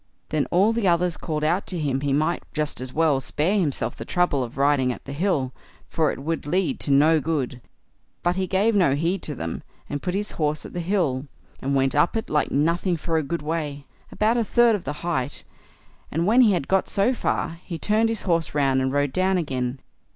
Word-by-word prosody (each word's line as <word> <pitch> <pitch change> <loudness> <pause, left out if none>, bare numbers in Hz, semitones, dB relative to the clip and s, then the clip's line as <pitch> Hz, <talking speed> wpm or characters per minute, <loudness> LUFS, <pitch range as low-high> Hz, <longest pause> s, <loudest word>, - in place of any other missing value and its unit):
Then 155 -2 0
all 195 +6 +3
the 225 -4 0
others 175 0 +2
called 155 -2 -3
out 175 +6 +1
to 180 - -2
him 140 -4 -1
he 140 -1 -1
might 155 +5 +1
just 150 -4 -1
as 130 0 -5
well 150 -2 +2
spare 175 +10 0
himself 150 -7 -1
the - - -7
trouble 175 -7 +1
of 120 +1 -8
riding 140 -2 +3
at - - -8
the 140 - -6
hill, 145 -5 0 0.4
for 160 -2 +1
it - - -6
would 160 +3 -3
lead 180 +3 0
to - - -4
no 150 +3 +5
good; 140 -5 -2 0.6
but 175 0 +2
he 190 0 -1
gave 200 +5 +2
no 180 -9 +3
heed 170 +5 0
to 150 - -4
them, 80 -7 -4 0.3
and 145 -1 -4
put 180 0 -2
his 205 +1 -2
horse 150 -1 -1
at - - -9
the 175 - -3
hill, 165 -7 0 0.3
and 140 +1 -1
went 135 -1 +2
up 150 +8 +2
it 220 - -4
like 150 - +2
nothing 170 +5 +1
for 165 +1 -2
a - - +2
good 155 +2 -4
way, 150 -3 -3 0.3
about 220 +3 +1
a 235 - +2
third 235 +2 +4
of 195 - -6
the - - -2
height; 145 -6 -2 0.7
and 165 +3 0
when 230 +6 +5
he 220 -5 +5
had 165 -7 -1
got 190 0 +1
so 205 +6 +2
far, 170 -7 -2
he 170 - -5
turned 215 +6 +2
his 225 -2 -3
horse 165 -4 0
round 135 -2 +2
and 130 0 0
rode 145 -1 0
down 185 0 +2
again. 130 -6 -2
160 Hz, 225 wpm, -24 LUFS, 140-185 Hz, 0.7 s, no